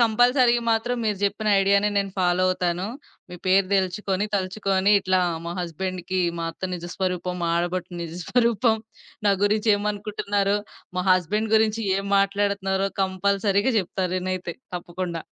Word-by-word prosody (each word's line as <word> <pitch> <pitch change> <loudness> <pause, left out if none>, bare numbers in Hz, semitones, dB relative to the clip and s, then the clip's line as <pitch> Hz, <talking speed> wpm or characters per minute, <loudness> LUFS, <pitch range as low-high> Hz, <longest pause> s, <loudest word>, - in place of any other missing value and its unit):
కంపల్సరీగ 240 +2 +4
మాత్రం 240 +2 0
మీరు 210 -2 0
చెప్పిన 215 +2 0
ఐడియానే 200 +1 +3
నేను 195 -1 +1
ఫాలో 180 0 +2
అవుతాను. 180 0 -1 0.4
మీ 180 - -8
పేరు 190 +1 +4
దెలుచుకొని, 190 +1 0
తలుచుకొని 190 0 +1
ఇట్లా 185 -1 +2 0.3
మా 170 - -3
హస్బాండ్‌కి, 185 +2 -3 0.2
మా 165 - -2
అత్త 185 +3 -5
నిజస్వరూపం, 180 +1 -3
మా 170 - 0
ఆడపడు 175 +1 -2
నిజస్వరూపం 225 +7 +1 0.5
నా 200 - +5
గురించి 215 +2 +1
ఏమనుకుంటున్నారో, 205 -1 -1 0.4
మా 180 - +1
హస్బెండ్‌ 205 +5 +1
గురించి 220 0 +3 0.2
ఏం 195 0 -3
మాట్లాడుతున్నారో 195 -1 0 0.2
కంపల్సరీగా 200 +4 +1
జెప్తా 190 0 -2
నేనైతే 185 -1 -3 0.2
తప్పకుండా. 175 -1 -4
195 Hz, 130 wpm, -24 LUFS, 185-210 Hz, 0.5 s, నా